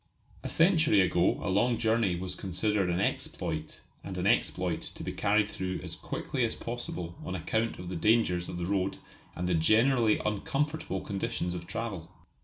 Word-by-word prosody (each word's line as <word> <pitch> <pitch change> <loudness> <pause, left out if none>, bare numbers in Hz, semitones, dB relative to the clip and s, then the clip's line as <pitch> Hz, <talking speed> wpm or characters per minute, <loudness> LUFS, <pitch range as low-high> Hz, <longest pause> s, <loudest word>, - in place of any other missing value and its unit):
A - - -5
century 165 - +4
ago 90 -1 +3
a - - 0
long 115 +5 +3
journey 110 -4 +2
was 90 +1 -4
considered 95 +1 0
an 90 +1 0
exploit, 80 -5 -2 0.2
and - - -6
an - - -1
exploit - - +1
to - - -8
be - - -3
carried 105 +1 +2
through 95 -3 -4
as - - -5
quickly 130 -3 -3
as 115 - +1
possible 105 -8 -5
on 90 - -4
account 110 +4 -1
of 90 - -8
the 90 - -4
dangers 90 -2 +2
of 85 - -5
the 85 - -2
road 95 0 0 0.4
and 90 0 -2
the 90 - +1
generally 110 +7 +4
uncomfortable 135 0 -1
conditions 95 -3 -2
of 85 -1 -6
travel. 95 -8 -4
100 Hz, 175 wpm, -30 LUFS, 90-115 Hz, 0.4 s, century